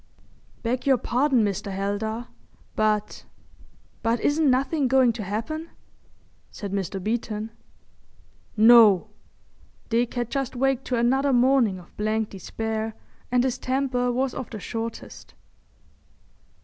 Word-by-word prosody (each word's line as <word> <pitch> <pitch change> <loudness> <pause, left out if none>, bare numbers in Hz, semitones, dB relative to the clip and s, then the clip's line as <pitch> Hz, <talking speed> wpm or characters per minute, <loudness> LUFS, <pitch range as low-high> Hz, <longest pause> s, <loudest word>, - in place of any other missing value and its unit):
"Beg 245 +3 -2
your 265 -2 +5
pardon, 250 -1 +2
Mr. 200 0 -3
Heldar, 205 +4 -3 0.5
but—but 215 +2 -3
isn't 295 +3 +2
nothin' 270 +2 +1
going 255 -2 +4
to 225 - -6
happen?" 230 - -4 0.8
said 200 -3 -7
Mr. 195 0 -2
Beeton. 220 +1 -3 1.1
"No!" 220 -4 +7 0.8
Dick 235 +2 0
had 240 -1 -2
just 270 -2 -2
waked 270 0 0
to 250 - -1
another 265 +4 +2
morning 250 -5 +3
of 175 -1 -15
blank 215 +1 -1
despair 220 +3 -4 0.4
and 250 0 +3
his 255 -2 -1
temper 255 -1 0
was 255 +1 -1
of 260 - -6
the 215 - -7
shortest. 225 +2 -7
235 Hz, 115 wpm, -25 LUFS, 215-260 Hz, 1.1 s, No